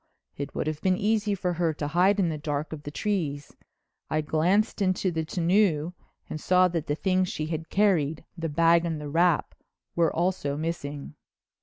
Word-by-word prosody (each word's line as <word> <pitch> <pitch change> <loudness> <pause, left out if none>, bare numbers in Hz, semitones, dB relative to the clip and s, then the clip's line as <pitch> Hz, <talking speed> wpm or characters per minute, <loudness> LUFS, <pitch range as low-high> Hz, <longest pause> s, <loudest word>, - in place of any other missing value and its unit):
It 140 - -6
would - - -1
have 155 0 -3
been 185 -1 +2
easy 210 0 +1
for 180 -1 -1
her 165 -2 0
to 145 0 -3
hide 185 +6 +3
in 180 -4 +2
the 155 - -3
dark 150 0 -3
of 155 - -7
the 145 - -7
trees. 150 -5 -3 0.5
I 155 - +1
glanced 180 +9 +1
into 185 -1 +1
the 160 -1 -2
tonneau 175 -1 +1 0.3
and 155 - -6
saw 185 0 +4
that 165 -2 -3
the 145 - 0
things 185 +1 +1
she 155 - -3
had 160 0 -4
carried, 170 -7 +1
the 165 -2 -3
bag 165 +2 +4
and 165 -3 -2
the 150 -1 -6
wrap, 170 +1 +2 0.4
were 170 -2 +3
also 170 -5 -1
missing. 150 -3 -4
165 Hz, 185 wpm, -27 LUFS, 155-185 Hz, 0.5 s, saw